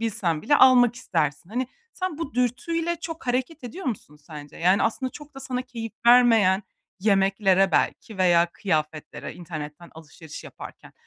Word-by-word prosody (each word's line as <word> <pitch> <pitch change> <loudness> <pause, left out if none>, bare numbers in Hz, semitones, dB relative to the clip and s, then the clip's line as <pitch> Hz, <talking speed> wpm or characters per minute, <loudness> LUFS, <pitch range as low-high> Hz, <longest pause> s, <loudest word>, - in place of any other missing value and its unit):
bilsen 175 -8 -1
bile 290 - +3
almak 245 -2 +6
istersin. 160 - -2
Hani, 250 +3 -2 0.3
sen 365 -5 -4
bu 305 -7 -5
dürtüyle 330 +8 -1
çok 325 -3 -7
hareket 255 +4 -2
ediyor 330 +7 -7
musun 180 - -5
sence? 150 -1 -12
Yani 185 +4 +3
aslında 255 +3 -1
çok 295 -1 -12
da 270 - -9
sana 255 -1 -3
keyif 230 -3 -7
vermeyen 225 -6 +5 0.4
yemeklere 195 -1 +3
belki 215 -4 -1
veya 175 -2 +4
kıyafetlere, 155 -5 -3
internetten 155 -1 -8
alışveriş 160 0 -11
yaparken - - -12
220 Hz, 145 wpm, -24 LUFS, 170-255 Hz, 0.4 s, almak